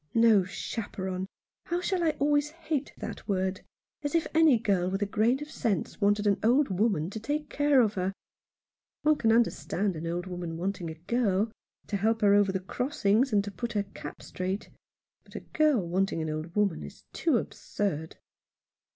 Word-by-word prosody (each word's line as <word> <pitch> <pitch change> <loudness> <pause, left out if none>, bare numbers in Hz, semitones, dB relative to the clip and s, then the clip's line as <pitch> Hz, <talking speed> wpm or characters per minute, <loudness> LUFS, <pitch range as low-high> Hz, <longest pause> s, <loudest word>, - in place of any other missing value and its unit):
" - - -43
No 225 -4 +6
chaperon! 190 -1 -4 0.4
How 345 - -1
I - - -2
shall 360 -3 +1
always 290 +1 +2
hate 315 -3 -3
that - - -7
word! 190 -2 -1 0.4
As 290 +1 -2
if 330 - +3
any 315 -5 +6
girl 195 -5 +1
with 195 +2 -1
a - - +1
grain 225 +5 +2
of 300 - -11
sense 220 - -2
wanted 205 +1 +3
an 200 -1 +3
old 250 +5 +3
woman 190 -4 +1
to 220 - -5
take 295 +6 -3
care 290 -2 +4
of 215 -3 +2
her! 185 -1 -1 0.9
One 305 0 +4
can 225 - +2
understand 210 -4 +1
an 160 +1 -5
old 175 +1 -2
woman 175 -3 -5
wanting 185 -1 -3
a 160 - -6
girl 205 +3 0 0.2
— - - -43
to 205 - 0
help 220 +3 +1
her 200 -1 +5
over 205 -1 +4
the 190 - -1
crossings, 240 +3 +1
and 205 -2 +3
to 205 - -6
put 235 +3 -4
her 205 -2 +1
cap - - -8
straight. 185 +2 -4 0.5
But - - -19
a - - -4
girl 295 - +2
wanting 190 0 0
an 160 -1 -2
old 155 +3 -5
woman 205 -5 +1
is - - -10
too 310 -7 +2
absurd." 170 -7 -3
205 Hz, 190 wpm, -29 LUFS, 185-250 Hz, 0.9 s, No